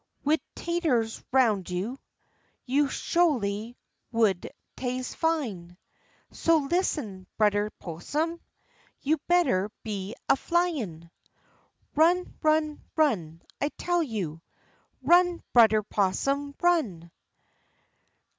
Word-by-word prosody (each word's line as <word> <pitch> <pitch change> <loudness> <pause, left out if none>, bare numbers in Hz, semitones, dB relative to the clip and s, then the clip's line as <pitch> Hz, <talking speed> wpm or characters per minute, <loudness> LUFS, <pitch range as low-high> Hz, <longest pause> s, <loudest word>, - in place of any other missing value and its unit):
Wid 305 +3 +2
taters 305 -11 0
roun' 230 -7 +3
you. 195 +9 -3 0.7
You 280 +3 +2
sholy 240 -12 0 0.4
would 220 -6 +1 0.3
tase 255 0 -3
fine 220 - -2 0.5
So 330 0 +3
listen, 240 - -1
Brudder 210 -1 +2
'Possum, 300 - -3 0.6
You 310 +2 +1
better 265 - +3
be 205 -2 -4
a 275 - +5
flyin'. 265 - -1 0.8
Run, 345 +4 +3
run, 310 -1 +1
run, 180 - +1 0.2
I 290 - +1
tell 350 -1 +1
you, 195 - -3 0.6
Run, 350 +4 +4
Brudder 220 -3 +6
'Possum, 275 +9 0
run! 215 - +1
255 Hz, 90 wpm, -27 LUFS, 200-320 Hz, 0.8 s, Brudder